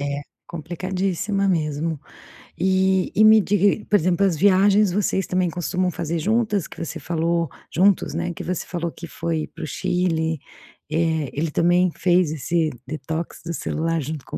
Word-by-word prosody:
É, 145 0 -3 0.2
complicadíssima 185 +4 -2
mesmo. 155 -2 -1 0.6
E 190 0 +2
e 215 - +5
me 215 0 +8
diga 200 0 +1
e 210 - 0
por 210 - +1
exemplo, 180 +2 +1
as 175 -5 +1
viagens 200 +1 +4
vocês 190 0 0
também 185 -1 +1
costumam 180 +2 -1
fazer 165 0 -3
juntas, 210 -1 +1
que - - -13
você - - -5
falou 170 -1 -1 0.2
juntos, 195 -1 +3
né, 175 +2 -2
que - - -7
você 180 -1 -3
falou 170 -1 -3
que 170 - -9
foi 160 0 -3
para 165 - -10
o - - -3
Chile, 165 -1 -1 0.5
eh, 160 -3 0
ele 155 +2 -1
também 175 +3 +3
fez 175 -3 +3
esse 160 +1 0 0.2
detox 160 +3 -5
do 170 - -3
celular 165 +1 -1
junto 150 0 -5
com - - -6
175 Hz, 165 wpm, -22 LUFS, 160-190 Hz, 0.6 s, me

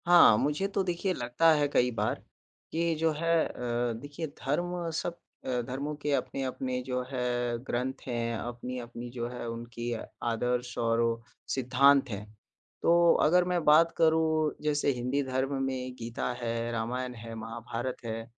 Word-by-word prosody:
हाँ, 175 -11 +8
मुझे 150 - +1
तो 200 -1 0
देखिए, 185 +1 -1
लगता 125 +5 +3
है 145 -1 +2
कई 125 -3 +3
बार 105 0 -1 0.5
कि 165 +1 +1
जो 160 0 +3
है 165 +1 +2
अ, 120 -1 -2
देखिए, 145 +5 -5
धर्म 170 +5 -2
सब 175 -1 -4 0.3
अ, 125 -1 0
धर्मों 140 +4 -3
के 145 - -1
अपने-अपने 130 -2 -2
जो 125 0 -2
है, 120 -2 -1
ग्रंथ 130 +1 -2
हैं, 115 -1 -1
अपनी-अपनी 120 0 -6
जो 120 -1 -3
है, 125 -1 -6
उनकी 120 +1 -5 0.3
आदर्श 120 +1 -1
और 115 0 +2 0.5
सिद्धांत 135 +2 +4
हैं। 105 -1 -5 0.6
तो 170 0 +5
अगर 180 +4 +5
मैं 180 -2 +1
बात 160 +3 +6
करूँ, 160 -1 +3
जैसे 145 -1 +2
हिंदी 125 +3 -1
धर्म 130 +1 -1
में 130 -1 -3
गीता 120 +1 -3
है, 115 0 -2
रामायण 125 +2 -2
है, 115 0 -8
महाभारत 115 +2 -4
है। 115 0 -3
125 Hz, 150 wpm, -30 LUFS, 120-150 Hz, 0.6 s, हाँ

